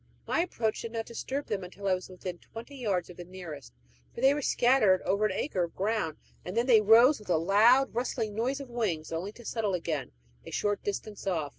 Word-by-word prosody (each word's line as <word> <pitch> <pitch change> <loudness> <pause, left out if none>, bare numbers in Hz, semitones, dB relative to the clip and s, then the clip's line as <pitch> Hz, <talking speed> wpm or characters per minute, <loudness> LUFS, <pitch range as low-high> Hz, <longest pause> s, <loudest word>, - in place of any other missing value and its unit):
My - - 0
approach 235 -11 -1
did 230 0 -6
not 225 -1 -3
disturb 265 +4 -4
them 200 -3 -3
until 195 +2 -7
I 190 - +4
was 185 0 -4
within 180 -1 -7
twenty 235 +5 -10
yards 195 -9 -2
of 175 - -15
the 175 - -7
nearest 175 -6 -9 0.4
for - - -6
they 270 +2 +6
were 295 - -2
scattered 240 -8 +3
over 200 +3 +2
an - - -4
acre 190 -3 -1
of 170 - -14
ground; 195 -6 -1 0.3
then 230 +7 -1
they 235 -4 +6
rose 230 +7 +6
with 210 - -15
a 170 - +4
loud, 220 +10 +4
rustling 230 -2 -2
noise 250 +6 -1
of 275 - -7
wings, 210 -10 -2
only 170 +5 -3
to 240 - -14
settle 215 -5 -1
again 160 -5 -3 0.3
at - - -18
a - - -7
short 205 -1 -1
distance 205 0 -5
off. 160 -6 0
210 Hz, 225 wpm, -29 LUFS, 180-235 Hz, 0.4 s, they